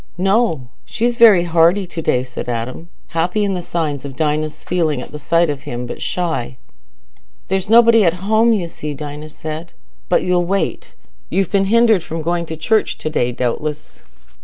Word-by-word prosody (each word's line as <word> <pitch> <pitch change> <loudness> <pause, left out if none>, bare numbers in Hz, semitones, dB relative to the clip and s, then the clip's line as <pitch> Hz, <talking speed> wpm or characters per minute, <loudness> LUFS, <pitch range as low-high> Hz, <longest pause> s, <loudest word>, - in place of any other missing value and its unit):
"No, 190 - +1
she's 235 +1 -1
very 210 -7 +7
hearty 170 +3 +3
to 170 -2 -6
day," 125 -5 +1
said 125 -1 -7
Adam, 120 +8 -4 0.2
happy 175 +5 0
in 200 -1 0
the 180 - -3
signs 155 -5 -3
of 140 -2 -7
Dinah's 155 +1 -1
feeling 160 -6 0
at - - -8
the 150 - -7
sight 170 +4 +2
of 145 -2 -3
him, 125 -4 -5
but 120 - -7
shy. 125 -3 -2 0.9
"There's 190 +1 -1
nobody 230 -1 +6
at 170 -2 +2
home, 220 +2 +4
you 195 -6 0
see," 150 -3 -6
Dinah 150 +1 -7
said; 155 +2 -7 0.4
"but 180 - +2
you'll 180 -1 +2
wait. 195 +2 -2 0.3
You've 195 -1 0
been 195 -1 +2
hindered 225 -1 +4
from 160 0 -5
going 170 +1 -1
to 160 - -6
church 215 +7 +1
to 155 - -4
day, 125 -5 0
doubtless." 145 +5 -4
165 Hz, 180 wpm, -18 LUFS, 150-195 Hz, 0.9 s, very